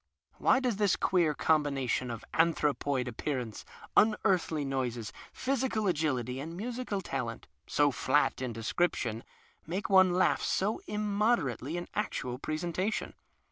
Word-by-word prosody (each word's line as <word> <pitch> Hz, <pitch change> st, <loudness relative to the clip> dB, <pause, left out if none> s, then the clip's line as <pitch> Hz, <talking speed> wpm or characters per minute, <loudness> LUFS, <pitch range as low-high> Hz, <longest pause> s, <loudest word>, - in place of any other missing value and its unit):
\Vhy 260 Hz, -, +5 dB
does 250 Hz, -6 st, 0 dB
tiiis 205 Hz, -2 st, +2 dB
queer 170 Hz, -5 st, +2 dB
combination 140 Hz, -6 st, +1 dB
of 115 Hz, -1 st, -6 dB
antiu'opoid 145 Hz, -5 st, +1 dB
appearance, 125 Hz, -2 st, -3 dB, 0.3 s
unearthly 190 Hz, -8 st, +3 dB
noises, 125 Hz, -5 st, -2 dB, 0.2 s
physical 255 Hz, -4 st, -1 dB
agility, 135 Hz, -, 0 dB
and 165 Hz, +5 st, -6 dB
musical 235 Hz, -2 st, -3 dB
talent 125 Hz, -8 st, -4 dB
— -, -, -46 dB
so 145 Hz, -1 st, +5 dB
flat 135 Hz, +1 st, +1 dB
in 130 Hz, -2 st, -2 dB
description— 115 Hz, 0 st, -1 dB, 0.4 s
make 190 Hz, +5 st, -3 dB
one 190 Hz, -1 st, +7 dB
laugh 180 Hz, +1 st, +2 dB
so 205 Hz, +3 st, 0 dB
inunoderately 205 Hz, -, 0 dB
in 175 Hz, -, -5 dB
actual 125 Hz, -11 st, -2 dB
presentation 170 Hz, +8 st, -2 dB
155 Hz, 125 wpm, -31 LUFS, 130-200 Hz, 0.4 s, one